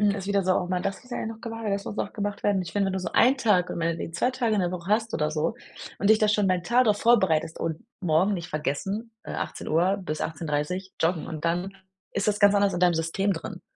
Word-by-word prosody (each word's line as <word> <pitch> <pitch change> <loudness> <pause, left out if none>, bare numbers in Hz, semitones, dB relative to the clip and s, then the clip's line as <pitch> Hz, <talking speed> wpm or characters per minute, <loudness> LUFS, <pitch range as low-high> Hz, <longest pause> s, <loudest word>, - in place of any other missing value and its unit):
ist 195 -2 -5
wieder 200 -1 +1
so: 185 0 +3
„Ach 180 - 0
man, 180 0 -1
das 195 +1 -3
ist 250 - -19
ja - - -3
noch 225 0 -8
gewa 225 -2 -4
das 200 0 -2
muss 205 - -6
auch 200 - -2
gemacht 205 -1 -3
werden. 200 -2 +2
Ich 165 - -8
finde, 200 -1 +1
nur 190 0 -2
so 185 - -4
einen 260 +3 +5
Tag 200 -8 +2
und - - -4
meinetwegen 165 0 -2
2 245 - +1
Tage 235 -4 0
in 200 - +2
der 175 - 0
Woche 180 0 -6
hast 225 +1 +1
oder 150 0 +1
so 155 +4 -1 0.5
und 200 - +2
dich 220 - +7
da 215 - +3
schon 210 -1 +2
mal 185 - +3
'n 175 - -7
Tag 245 +7 +3
drauf 210 -2 +3
vorbereitest 190 -9 +3
und 160 -1 -3
morgen 180 +3 +2
nicht 175 -3 -4
vergessen, 195 +10 -3
äh, - - -7
18:00 180 +5 0
bis 155 -4 -4
18:30 160 +4 -3
joggen 165 0 +1
und 160 -1 -5
dann 175 +3 0 0.4
ist 200 +1 -1
das 210 -1 +1
ganz 205 0 +6
anders 200 -1 +3
in 175 - -2
deinem 180 -1 +4
System 165 +5 0
drin. 165 - -7
190 Hz, 255 wpm, -26 LUFS, 170-205 Hz, 0.5 s, dich